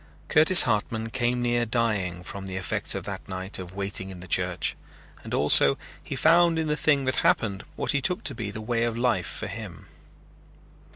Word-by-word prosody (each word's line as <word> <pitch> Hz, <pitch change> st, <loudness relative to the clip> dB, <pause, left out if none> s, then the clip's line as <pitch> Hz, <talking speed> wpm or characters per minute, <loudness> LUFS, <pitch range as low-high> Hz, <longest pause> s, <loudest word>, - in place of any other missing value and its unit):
Curtis 160 Hz, +4 st, +7 dB
Hartman 110 Hz, 0 st, -2 dB
came 120 Hz, +1 st, -1 dB
near 120 Hz, 0 st, +1 dB
dying 105 Hz, -7 st, -2 dB
from 95 Hz, +1 st, -8 dB
the 95 Hz, -, -5 dB
effects 95 Hz, -1 st, -1 dB
of -, -, -4 dB
that -, -, -8 dB
night 95 Hz, +2 st, -3 dB
of 90 Hz, 0 st, -9 dB
waiting 100 Hz, -1 st, -3 dB
in 95 Hz, -2 st, -10 dB
the 90 Hz, -, -11 dB
church, -, -, -1 dB, 0.5 s
and -, -, -10 dB
also 70 Hz, 0 st, +5 dB, 0.3 s
he -, -, -6 dB
found 170 Hz, 0 st, +4 dB
in 160 Hz, -, -1 dB
the 150 Hz, -1 st, -1 dB
thing 145 Hz, -3 st, +1 dB
that 130 Hz, 0 st, -1 dB
happened 100 Hz, -3 st, +1 dB
what -, -, -1 dB
he 140 Hz, -, 0 dB
took 180 Hz, +3 st, -1 dB
to 140 Hz, -, +3 dB
be 115 Hz, -3 st, -5 dB
the 110 Hz, +2 st, -7 dB
way 115 Hz, +1 st, -1 dB
of 115 Hz, -1 st, -2 dB
life 120 Hz, -7 st, 0 dB
for -, -, -6 dB
him. -, -, -8 dB
115 Hz, 195 wpm, -25 LUFS, 95-130 Hz, 0.5 s, Curtis